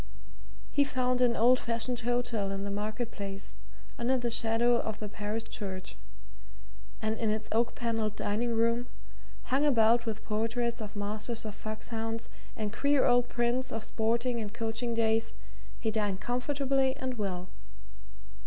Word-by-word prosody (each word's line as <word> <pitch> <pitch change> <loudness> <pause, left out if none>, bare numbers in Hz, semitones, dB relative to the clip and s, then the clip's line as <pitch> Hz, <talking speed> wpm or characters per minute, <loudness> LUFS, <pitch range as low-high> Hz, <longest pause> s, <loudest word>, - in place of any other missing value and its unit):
He 285 - +4
found 255 -2 +1
an 240 -2 +4
old 250 +3 +5
fashioned 235 +1 -1
hotel 240 -4 0
in 195 0 -3
the 200 - -3
marketplace, 205 -1 -4 0.5
under 250 +2 +2
the 240 -1 -1
shadow 235 +1 +3
of 220 -1 -2
the 210 - -4
parish 210 +2 -3
church, 190 -4 -5 1.1
and 220 0 0
in 225 - +1
its 215 0 -1
oak 230 +1 +2
panelled 225 -3 -1
dining 230 +3 0
room, 230 +2 +2 0.6
hung 270 +2 +1
about 235 -4 +4
with 220 -1 -3
portraits 230 +2 0
of 210 0 -6
masters 215 +3 -2
of 215 - -4
foxhounds 225 +1 -3 0.3
and 215 -2 -2
queer 280 +3 +3
old 245 0 +4
prints 240 +2 0
of 225 -1 -3
sporting 235 +2 0
and 210 +1 -5
coaching 230 +1 -1
days, 225 0 +2 0.5
he 220 - 0
dined 205 -3 0
comfortably 270 +2 +1
and 255 -3 -3
well. 185 -3 -2
230 Hz, 145 wpm, -31 LUFS, 215-245 Hz, 1.1 s, old